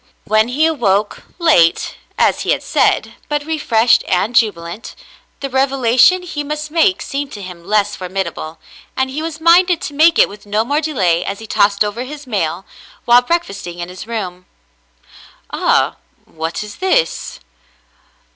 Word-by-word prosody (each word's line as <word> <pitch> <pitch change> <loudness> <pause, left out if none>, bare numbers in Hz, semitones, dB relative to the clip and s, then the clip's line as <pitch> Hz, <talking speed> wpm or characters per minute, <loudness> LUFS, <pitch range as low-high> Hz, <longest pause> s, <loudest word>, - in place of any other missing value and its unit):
When 215 +1 +2
he 280 +6 +1
awoke, 210 -10 0
— - - -35
late, 305 - +3 0.2
as - - +2
he - - -4
had - - -4
said, - - +1 0.2
but 295 -1 -1
refreshed 235 -8 +2
and 200 +6 0
jubilant, 200 -3 -1 0.2
— - - -36
the 275 - -2
revelation 265 +5 +3
he 300 -4 -5
must 300 +1 -5
make 340 +3 +2
seemed 280 0 -4
to 205 - -8
him 180 -2 -10
less 205 +2 +1
formidable, 180 -3 -5 0.4
and 260 0 0
he 295 +4 -4
was 320 -1 -5
minded 345 +1 +4
to 290 - -5
make 320 +3 +4
it - - +6
with 205 +1 -13
no 210 +2 0
more 290 +5 0
delay 185 - +1
as 200 - -4
he 220 - -10
tossed 205 -1 +2
over 210 +4 -4
his 295 +2 -9
mail, 195 -6 -2 0.4
while 240 +1 +6
breakfasting 225 - -3
in 175 0 -6
his 185 +4 -9
room. 185 -6 -5 1.0
"Ah, - - +1 0.3
what 160 +5 -5
is 210 -1 -10
this 430 +6 0
230 Hz, 165 wpm, -17 LUFS, 195-300 Hz, 1.0 s, it